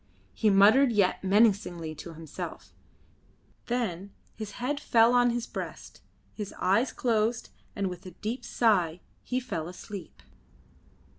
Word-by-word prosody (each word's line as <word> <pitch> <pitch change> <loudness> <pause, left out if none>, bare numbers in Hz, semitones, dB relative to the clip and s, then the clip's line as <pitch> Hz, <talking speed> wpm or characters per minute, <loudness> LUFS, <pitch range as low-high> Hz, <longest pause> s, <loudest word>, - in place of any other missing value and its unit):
He 220 - +2
muttered 215 +7 +6
yet 200 -4 +2
menacingly 190 -5 +2
to 165 +2 -9
himself, 160 -2 -8 0.9
then 200 -6 -2 0.2
his 215 -2 -7
head 280 +4 -2
fell 230 -2 +4
on 245 0 +5
his 240 0 -2
breast, - - -7 0.3
his 210 -2 -6
eyes 225 +7 +2
closed, 230 -1 0 0.3
and 200 -1 -1
with 180 0 -7
a 180 0 -12
deep 230 +5 -4
sigh 180 -8 +1 0.2
he 255 - -2
fell 165 -10 -4
asleep. 180 - -9
210 Hz, 130 wpm, -28 LUFS, 180-235 Hz, 0.9 s, muttered